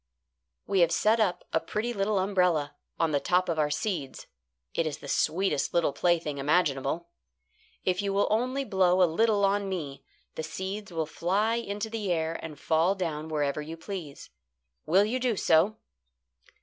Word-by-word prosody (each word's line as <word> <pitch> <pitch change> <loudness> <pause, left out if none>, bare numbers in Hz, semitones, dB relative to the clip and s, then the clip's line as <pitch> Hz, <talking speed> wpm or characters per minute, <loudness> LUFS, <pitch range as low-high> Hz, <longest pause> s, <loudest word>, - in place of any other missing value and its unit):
"We 195 -1 +1
have 170 -1 +4
set 220 +5 +3
up 180 -5 +1
a - - +3
pretty 220 +7 -3
little 200 0 0
umbrella 180 -6 +1 0.3
on 165 -1 +2
the 145 - +2
top 180 +5 +1
of 165 -2 -1
our 150 -1 +2
seeds. 155 -5 -3 0.5
It 165 - 0
is 150 -1 -4
the - - -11
sweetest 160 -3 0
little 170 -4 +2
plaything 160 -3 0
imaginable. 150 +1 +1 0.8
If 185 +1 +1
you 200 -1 -1
will 200 +1 +2
only 255 +5 0
blow 185 -3 +3
a - - +7
little 210 0 +3
on 200 0 +1
me, 150 -7 -5 0.3
the - - -4
seeds 190 +6 -5
will 165 -2 -1
fly 200 +8 0
into 210 -1 -3
the 215 -4 -3
air 160 -1 -1
and 155 -2 -8
fall 165 +6 +2
down 160 -5 -3
wherever 150 -2 -1
you 160 +2 -7
please. 165 -5 -8 0.6
Will 190 +6 +5
you 245 +4 -1
do 245 -3 +1
so?" 185 +4 +3
180 Hz, 170 wpm, -28 LUFS, 160-200 Hz, 0.8 s, a